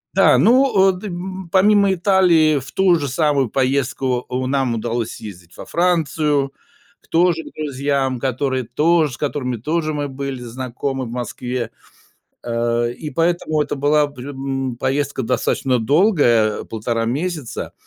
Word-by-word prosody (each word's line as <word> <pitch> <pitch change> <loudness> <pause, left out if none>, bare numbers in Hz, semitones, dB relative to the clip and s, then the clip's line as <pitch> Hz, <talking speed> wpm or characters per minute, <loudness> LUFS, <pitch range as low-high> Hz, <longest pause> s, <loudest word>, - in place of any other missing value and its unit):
Да, - - +5
ну, 260 +3 +4 0.2
а - - +4
д 190 +3 -7
м 185 0 -6
помимо 200 +1 +4
Италии, 175 -5 +3
в 135 +2 -11
ту 190 -2 +3
же 145 - -2
самую 140 -3 +1
поездку 130 -1 0
у 130 +1 -2
нам 130 -3 0
удалось 115 0 -2
съездить 90 -5 -11
во - - -8
Францию 155 -5 +1 0.5
к - - -28
тоже 170 0 +2
к - - -12
друзьям, 140 -3 -1
которые 130 0 -1
тоже, 150 +5 +2
с - - -8
которыми 130 -4 -2
тоже 155 +6 -1
мы 145 -1 -2
были 135 -1 -5
знакомы 130 +2 -4
в 115 - -8
Москве, 120 0 -4 0.7
э, 120 0 0
и 150 +4 -7
поэтому 165 0 0
это 145 - -2
была 145 +1 +2
пр 135 -2 -10
м 135 -2 -3
поездка 135 +1 -1
достаточно 125 +1 0
долгая, 120 - +3
1,5 115 +1 -3
месяца, 145 +3 -3
140 Hz, 150 wpm, -20 LUFS, 125-160 Hz, 0.7 s, Да